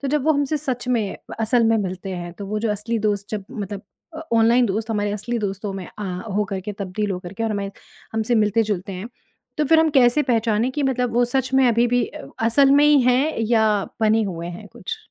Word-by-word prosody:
तो 275 - -3
जब 295 -1 0
वो 315 - +4
हमसे 285 +1 0
सच 260 -4 -3
में 225 -6 +1 0.2
व - - -5
असल 230 +1 +3
में 225 0 +4
मिलते 190 0 -4
हैं, 175 -1 -6
तो 200 +2 -8
वो 215 +1 -2
जो 220 -1 -1
असली 215 +3 -2
दोस्त 205 -1 -1
जब 210 -3 -4
मतलब 200 -1 -6 0.3
अ, - - -6
ऑनलाइन 230 +2 +4
दोस्त 215 +3 -2
हमारे 205 -1 0
असली 235 +3 -3
दोस्तों 200 -1 -3
में 190 -2 -6
आ 205 - -4 0.3
हो 210 - +2
कर 195 -1 -2
के 210 +2 -5
तब्दील 200 +1 -3
हो 180 - -2
कर 175 0 -9
के 225 - -5
और 225 - 0
हमें 200 -1 -2 0.4
हमसे 225 +2 0
मिलते-जुलते 210 -3 +1
हैं। 190 +5 -6 0.5
तो 300 - +3
फ़िर 320 +2 +5
हम 320 - +3
कैसे 265 +1 +4
पहचाने 230 -1 +1
कि 290 +2 -2
मतलब 250 -3 0
वो 245 0 +4
सच 260 +1 -1
में 265 -1 +5
अभी-भी 240 +1 +2
अ - - -10 0.2
असल 275 +4 +4
में 285 +1 +6
ही 295 -1 +6
है 250 +1 +2
या 225 -2 +4 0.4
बने 220 0 +3
हुए 170 -3 -5
हैं 180 +4 -8
कुछ? 235 -6 -6
225 Hz, 235 wpm, -22 LUFS, 205-250 Hz, 0.5 s, में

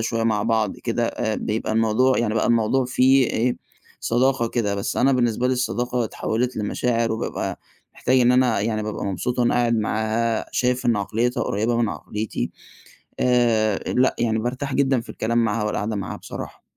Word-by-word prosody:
شوية 115 0 -1
مع 110 -2 +1
بعض 110 -2 0
كده، 115 0 -1
آآ 110 -1 -2
بيبقى 110 +1 -2
الموضوع 115 +4 +2
يعني 110 -2 0
بقى 110 - +1
الموضوع 120 +3 +2
فيه 130 +1 +4
إيه 120 +2 0 0.4
صداقة 120 0 +1
كده، 105 -4 -1
بس 100 - -3
أنا 135 +1 +3
بالنسبة 120 -1 +1
لي 130 - +2
الصداقة 125 -1 -1
اتحوِّلت 120 +3 -2
لمشاعر 115 +2 0
وبابقى 110 - -3 0.4
محتاج 130 0 +2
إن 125 0 +5
أنا 125 -4 +3
يعني 110 +1 -1
بابقى 105 0 -4
مبسوط 100 +6 -2
وأنا 120 -1 +2
قاعد 120 -1 +2
معاها. 110 +1 -1
شايف 125 0 0
إن 115 -3 +3
عقليّتها 115 +5 -1
قريّبة 110 +4 0
من 115 -2 +1
عقليتي. 105 - -4 0.7
آآ 115 -4 +2 0.2
لأ، 130 +1 +3
يعني 110 -2 +1
بارتاح 130 +4 -3
جدًا 135 -3 +2
في 115 - -16
الكلام 115 +2 -2
معاها، 110 0 0
والقعدة 105 +1 -2
معاها 100 -3 -4
بصراحة. - - -8
115 Hz, 170 wpm, -23 LUFS, 110-125 Hz, 0.7 s, إن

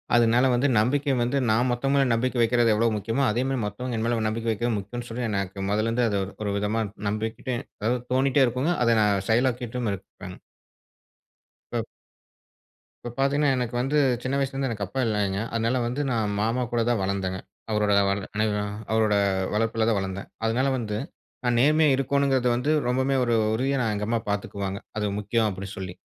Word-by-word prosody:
அதனால 120 +2 +4
வந்து 125 +4 +2
நம்பிக்கை 135 +5 +1
வந்து 125 +4 0
நான் 115 +4 +3
மத்தவங்க 135 +3 +1
மேல 135 -2 +4
நம்பிக்கை 120 +1 0
வைக்கிறது 115 0 +3
எவ்வளவு 110 +1 +2
முக்கியமோ, 115 +6 -1
அதே 120 +4 0
மாதிரி 135 -2 -1
மத்தவங்க 125 +4 -4
என் 110 - -1
மேல 120 0 +1
நம்பிக்கை 115 +1 -2
வைக்கிறது 115 +1 -1
முக்கியம்னு 120 +5 -6
சொல்லி, 120 +2 -4
எனக்கு 100 -1 -3
மொதல்லருந்து 115 +4 +1
அது 100 -1 0 0.2
ஒரு 100 - -1
விதமா 105 +2 0 0.3
நம்பிக்கிட்டேன் 115 +4 -3 0.2
அதாவது 120 +4 +1
தோணிக்கிட்டே 135 +1 +4
இருக்குங்க. 130 +8 0
அதை 115 -1 +4
நான் 100 -2 +2
செயலாக்கிட்டும் 120 0 0
இருப்பேங்க. 95 -1 -9 1.4
இப்ப - - -1 1.2
இப்ப 120 0 -6
பார்த்தீங்கன்னா 140 +1 +2
எனக்கு 125 -1 -2
வந்து 135 +4 +1 0.3
சின்ன 130 +2 -1
வயசுலருந்து 135 0 -1
எனக்கு 105 -3 -3
அப்பா 130 +8 -5
இல்லைங்க. 100 -3 0
அதனால 115 +2 +1
வந்து 125 +5 -2
நான் 110 -4 0
மாமா 115 +4 0
கூட 120 -1 +1
தான் 120 -4 +1
வளர்ந்தேங்க. 95 -1 -2 0.3
அவரோட 105 -1 +1 1.0
அவரோட 110 -2 +3 0.4
வளர்ப்புல 115 +1 +1
தான் 110 - +2
வளர்ந்தேன். 95 0 -5 0.2
அதனால 120 +4 +1
வந்து 105 -4 -3 0.5
"நான் 120 -1 +2
நேர்மையா 150 +1 +4
இருக்கோனுங்றது" 135 -2 +1
வந்து, 125 +5 0 0.2
ரொம்பவே 130 +2 +1
ஒரு 120 -1 +1 0.2
உறுதியா 135 +3 0
நான் 110 -2 0
எங்க 105 0 -3
அம்மா 115 0 +1
பார்த்துக்குவாங்க. 100 -1 -3 0.2
அது 105 - 0
முக்கியம் 110 +2 +1
அப்டினு 100 0 -7
சொல்லி. 95 -2 -6
115 Hz, 165 wpm, -25 LUFS, 105-130 Hz, 1.4 s, அதனால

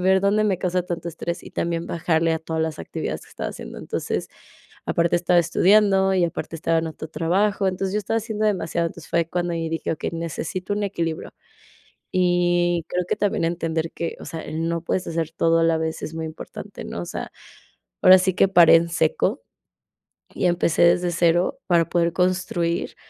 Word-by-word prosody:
ver 190 +1 +4
dónde 205 +2 +3
me 200 -3 +1
causa 180 0 0
tanto 175 -1 -4
estrés 170 +1 -5
y - - -11
también 170 0 -2
bajarle 165 -1 +1
a 160 - 0
todas 160 0 -2
las 160 -1 -3
actividades - - -4
que - - -17
estaba - - -5
haciendo, - - -9
entonces, - - -3 0.6
aparte 170 +1 +2
estaba 175 0 +3
estudiando 195 +2 +4
y 180 -2 +3
aparte 165 -1 -4
estaba 165 +1 +1
en 160 - -1
otro 160 0 -7
trabajo, 195 +5 +1
entonces, 190 +1 -2
yo 210 - +1
estaba 210 +2 -2
haciendo 215 -1 -2
demasiado, 170 -4 0
entonces, 165 -1 -13
fue 170 -1 +1
cuando 175 0 -1
ahí 165 -1 -2
dije: 165 0 -2
"Okey, 160 - -4
necesito 170 +3 -4
un 205 +1 -1
equilibrio", 170 -5 -3 0.8
y 175 -1 +2
creo 180 0 -1
que - - -1
también 200 -4 0
entender 165 -1 -2
que, 170 - -4
o - - -8
sea, 165 - -5
el 160 +2 -3
no 170 -1 -2
puedes 180 +1 -2
hacer 165 -1 -2
todo 165 0 +2
a - - +3
la 165 0 +3
vez 160 0 -3
es 155 - -5
muy 160 0 -4
importante, 155 - -9
¿no?, 85 - -5
o 85 - -6
sea, - - -5 0.7
ahora 185 0 +9
sí 190 +1 +1
que 195 - +4
paré 175 -3 +7
en 170 +1 +1
seco, 470 - 0 0.9
y 185 - 0
empecé 175 -2 +2
desde 175 +1 +4
0 175 +10 +2
para 170 -2 +3
poder 170 -1 +1
construir 180 -2 0
170 Hz, 195 wpm, -23 LUFS, 165-185 Hz, 0.9 s, ahora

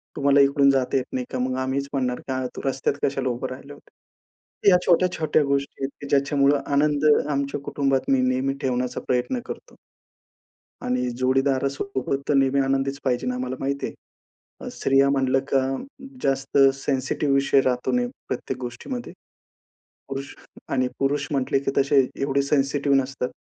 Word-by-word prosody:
"तुम्हाला 140 0 +3
इकडून 140 0 +4
जाता 135 0 +1
येत 130 - -1
नाही 125 -1 -2
का?" 130 - -3
मग 130 0 -1
आम्हीच 135 +1 -1
म्हणणार, 125 -2 -1
"का 130 -1 -2
तू - - -6
रस्त्यात 135 +1 0
कशाला 135 -1 0
उभं 120 +1 -3
राहिलं 135 +2 -9
होता?" 145 - -22 0.6
या 180 - +7
छोट्या-छोट्या 170 -3 +2
गोष्टी 140 0 -2
आहेत 135 - 0
की 145 - -6
ज्याच्यामुळं 140 0 +3
आनंद 145 +1 +2 0.2
आमच्या 140 0 -1
कुटुंबात 135 -2 0
मी 135 - +4
नेहमी 130 +2 +1
ठेवण्याचा 125 -1 -1
प्रयत्न 125 0 0
करतो. - - -9 1.1
आणि 125 0 0
जोडीदारासोबत 135 +2 0
तर - - +4
नेहमी 135 0 +3
आनंदीच 135 +1 -1
पाहिजे. 125 -1 0
आम्हाला 130 +1 -3
माहिती 140 +1 -2
आहे, - - -15 0.5
स्त्रिया 135 0 +2
म्हणलं 135 -1 +2
का 135 - +5 0.6
जास्त 135 +1 0 0.2
सेन्सिटिव्ह 135 +1 -1
विषय 135 0 +4
राहतो 125 -2 0
नेहमी 245 0 0 0.2
प्रत्येक 130 0 -4
गोष्टीमध्ये. 125 - -6 1.0
पुरुष 135 +1 -6 0.3
आणि 130 -2 +1
पुरुष 140 +1 0
म्हटले 135 -1 +1
की 135 - -1
तसे 140 0 +4 0.2
एवढे 140 0 +1
सेन्सिटिव्ह 140 0 +1
नसतात, 130 -1 -2
135 Hz, 150 wpm, -24 LUFS, 130-140 Hz, 1.1 s, या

